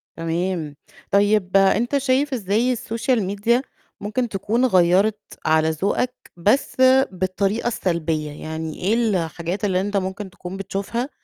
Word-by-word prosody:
تمام، 165 -2 -2 0.4
طيب 200 -1 +3
أنت 225 +8 +3
شايف 275 +1 +1
إزاي 225 +2 +1
السوشيال 230 0 -1
ميديا 205 +6 +1 0.4
ممكن 215 +4 -2
تكون 215 +5 0
غيّرت 190 0 +3 0.3
على 160 0 +3
ذوقك 200 +10 -1 0.2
بس 210 +10 +1 0.4
بالطريقة 195 +4 -1
السلبية، 165 -8 -1
يعني 160 +1 -6
إيه 195 +4 +1
الحاجات 185 -4 -1
اللي 185 -2 +1
أنت 205 +1 -1
ممكن 190 +1 -3
تكون 185 0 -8
بتشوفها 200 +6 -3
195 Hz, 125 wpm, -22 LUFS, 180-225 Hz, 0.4 s, طيب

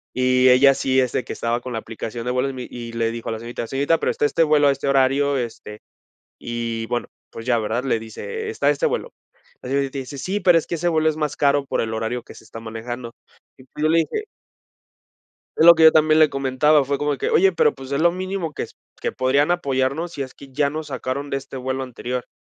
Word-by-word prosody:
y 130 0 +4
ella 135 +2 +6
sí, 130 0 +1
es 125 -2 +1
de - - -1
que - - -6
estaba 120 +1 -1
con 125 0 -6
la 115 - -2
aplicación 115 +1 -6
de 125 - -1
vuelos 125 +2 0
y - - -11
me 130 -1 -6
y 120 -1 -7
le 115 -1 0
dijo 115 0 -6
a - - -2
la 110 - -5
señorita, 115 0 -6
señorita, 145 +6 +1
pero - - 0
está - - 0
este 165 +3 +2
vuelo 150 -2 +4
a - - +5
este 140 0 -3
horario, 140 +1 +2
este, 115 -3 -6 0.6
y 115 -1 -3
bueno, 120 +1 -2 0.2
pues 115 - -9
ya, 120 -2 +3
¿verdad?, 110 +3 -2
le 130 -4 +1
dice, 445 - -6
está 440 - +1
este - - +1
vuelo, 480 +1 -2 0.5
la 125 - -7
señorita 140 0 -1
dice: 135 +1 -7
"Sí, 195 +8 -2
pero 175 -3 +5
es 160 - -5
que - - -3
ese 175 +2 0
vuelo 160 -2 +2
es 155 - -1
más 150 -2 -2
caro 140 -1 +2
por - - -1
el 110 -1 -3
horario 115 +2 -3
que - - -13
se - - -14
está 115 - -10
manejando", 115 +2 -6 0.5
y - - -14
pues 135 +3 -9
yo - - +4
le 165 +1 +4
dije 295 - -1 1.3
es - - +5
lo 170 0 +10
que 160 -1 +4
yo 160 - +9
también 155 0 +4
le 155 - +7
comentaba, 140 +2 +2
fue 140 +1 -1
como 145 -1 0
que: - - -2
"Oye, 190 +2 +5
pero, 150 -3 +2
pues, 135 -1 -10
es 140 +1 0
lo 170 +1 +4
mínimo 185 -2 -4
que - - -4
s - - -15 0.3
que - - -1
podrían 140 +4 +2
apoyarnos 140 0 0
si 145 - -8
es 130 - -8
que 140 - -13
ya 145 +1 +1
nos 155 +1 -5
sacaron 135 +1 -4
de 135 - 0
este 135 0 -10
vuelo 130 +1 -3
anterior, 125 0 -5
135 Hz, 250 wpm, -22 LUFS, 125-155 Hz, 1.3 s, lo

